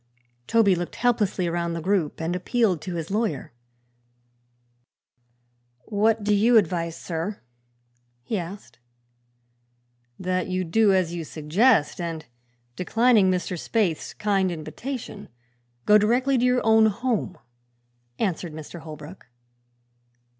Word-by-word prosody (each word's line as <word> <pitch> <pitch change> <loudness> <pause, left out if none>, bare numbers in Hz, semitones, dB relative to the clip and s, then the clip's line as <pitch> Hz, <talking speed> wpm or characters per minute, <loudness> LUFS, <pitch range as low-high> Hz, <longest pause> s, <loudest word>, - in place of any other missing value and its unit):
Toby 220 -4 +4
looked 175 -1 -4
helplessly 215 -6 +1
around 170 0 -1
the 165 - -3
group 180 -3 0
and 165 +2 -2
appealed 185 -2 +1
to 180 -2 -5
his 165 +1 -5
lawyer. 210 - -2 2.3
"What 215 +1 +1
do 210 0 +2
you 225 +4 +5
advise, 170 -4 +1
sir?" 175 +5 -4 0.8
he 215 - -3
asked. 170 - -9 1.4
"That 185 0 -1
you 185 0 -1
do 205 +5 +3
as 185 -3 +1
you 170 -1 -4
suggest 160 - +2
and, 165 -2 -4 0.5
declining 225 +1 +3
Mr. 180 -1 -1
Spaythe's 190 -8 -1
kind 195 -3 +1
invitation, 215 - -6 0.6
go 210 0 +6
directly 250 +6 +2
to 250 0 +2
your 250 -2 +2
own 220 0 +6
home," 220 -3 -2 0.8
answered 175 -5 -2
Mr. 155 +2 -9
Holbrook. 155 +2 -11
190 Hz, 115 wpm, -24 LUFS, 170-220 Hz, 2.3 s, go